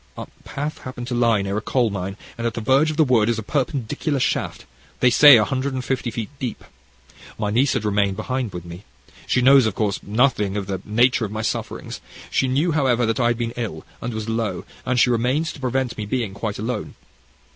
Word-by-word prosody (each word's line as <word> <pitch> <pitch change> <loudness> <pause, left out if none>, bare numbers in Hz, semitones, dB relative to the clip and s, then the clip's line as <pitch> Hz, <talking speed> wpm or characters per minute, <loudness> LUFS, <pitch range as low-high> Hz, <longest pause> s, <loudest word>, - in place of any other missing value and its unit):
Our - - -5 0.2
path 145 +2 -5
happened 130 -1 -7
to - - -2
lie 115 -4 +2
near 100 +1 -2
a - - -1
coal 120 -1 +1
mine, 95 0 -4 0.2
and 115 -1 -2
at 115 - -4
the - - -2
verge 135 +7 +3
of 155 - -4
the 160 - +6
wood 120 -5 +3
is 115 - +1
a 110 - -4
perpendicular 135 +2 -1
shaft, - - -1 0.3
they 125 - +4
say, 145 +1 +9
a 105 - +3
hundred 135 +2 -2
and 130 -1 -4
fifty 130 -2 -1
feet 115 0 -5
deep. 125 -4 -4 0.7
My 105 -1 -1
niece 130 +5 +3
had 110 - -2
remained 100 -2 +1
behind 130 -4 -2
with 90 -1 -7
me 85 +3 -9 0.4
she 125 - +2
knows, 135 -2 +7
of 110 - -3
course 105 -3 0
nothing 105 -3 +1
of 100 - -2
the 95 -1 -4
nature 120 +3 +3
of 105 - -6
my 110 +1 -3
sufferings. - - -4 0.3
She 135 - +2
knew, 145 +7 +1
however, 130 -6 +2
that 115 +2 -1
I 120 - +3
had 120 -1 +1
been 115 -1 -3
ill, 115 -4 -5 0.2
and 120 - -3
was 110 -1 -5
low, 115 -2 -2 0.2
and 130 0 +2
she 125 - +4
remained 125 +7 +1
to - - -12
prevent 130 -1 -1
my 105 - -4
being 110 -2 -2
quite 105 +1 -4
alone. 110 0 -4
120 Hz, 225 wpm, -22 LUFS, 105-130 Hz, 0.7 s, say